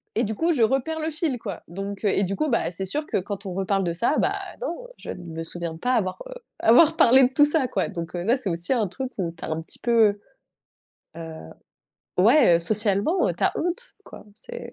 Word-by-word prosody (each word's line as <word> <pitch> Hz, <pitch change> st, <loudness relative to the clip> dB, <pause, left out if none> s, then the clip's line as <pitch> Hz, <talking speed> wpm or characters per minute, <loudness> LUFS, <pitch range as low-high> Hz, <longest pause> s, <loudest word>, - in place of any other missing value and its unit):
Et 230 Hz, -, +2 dB
du 215 Hz, 0 st, -2 dB
coup, 335 Hz, +6 st, +1 dB
je 250 Hz, -, 0 dB
reperds 270 Hz, +7 st, +1 dB
le 315 Hz, +1 st, -2 dB
fil, 305 Hz, -6 st, -2 dB
quoi. 200 Hz, -7 st, -7 dB
Donc 195 Hz, +4 st, -6 dB
heu -, -, +4 dB
et 195 Hz, -, +1 dB
du 195 Hz, +2 st, -2 dB
coup, 310 Hz, -, -1 dB
bah, 230 Hz, -, +1 dB
c'est 190 Hz, +2 st, -4 dB
sûr 300 Hz, +11 st, -3 dB
que -, -, 0 dB
quand 200 Hz, +1 st, -5 dB
on 185 Hz, -, -4 dB
reparle 195 Hz, +1 st, 0 dB
de 170 Hz, -2 st, -1 dB
ça, 235 Hz, -, +1 dB
bah, -, -, +1 dB, 0.3 s
non, -, -, -5 dB
je -, -, -10 dB
ne -, -, -6 dB
me 165 Hz, -1 st, -6 dB
souviens 170 Hz, 0 st, -6 dB
pas 250 Hz, +8 st, 0 dB
avoir, 185 Hz, -4 st, -1 dB
heu, -, -, -8 dB, 0.3 s
avoir 310 Hz, +8 st, +5 dB
parlé 260 Hz, +3 st, +6 dB
de 250 Hz, -, +4 dB
tout 290 Hz, +2 st, +6 dB
ça, 295 Hz, -3 st, +1 dB
quoi. 195 Hz, -7 st, -1 dB
Donc, 170 Hz, +1 st, -6 dB
heu, 175 Hz, -, -3 dB
là, 240 Hz, +6 st, +2 dB
c'est 215 Hz, -7 st, -3 dB
aussi 170 Hz, +9 st, 0 dB
un 220 Hz, -5 st, +1 dB
truc 260 Hz, +7 st, -5 dB
où 170 Hz, -3 st, -2 dB
tu -, -, -13 dB
as -, -, -4 dB
un 155 Hz, +1 st, -2 dB
petit 165 Hz, -, -10 dB
peu, 225 Hz, -4 st, +3 dB, 1.0 s
heu, -, -, -7 dB
heu, 160 Hz, -, -10 dB, 0.6 s
ouais, 230 Hz, -, +6 dB
heu, -, -, +2 dB
socialement, 210 Hz, -, +1 dB
heu, -, -, -1 dB
tu -, -, -3 dB
as -, -, +4 dB
honte, 360 Hz, +8 st, -3 dB
quoi, -, -, -13 dB
c'est 480 Hz, -, -9 dB
215 Hz, 250 wpm, -24 LUFS, 185-285 Hz, 1.0 s, parlé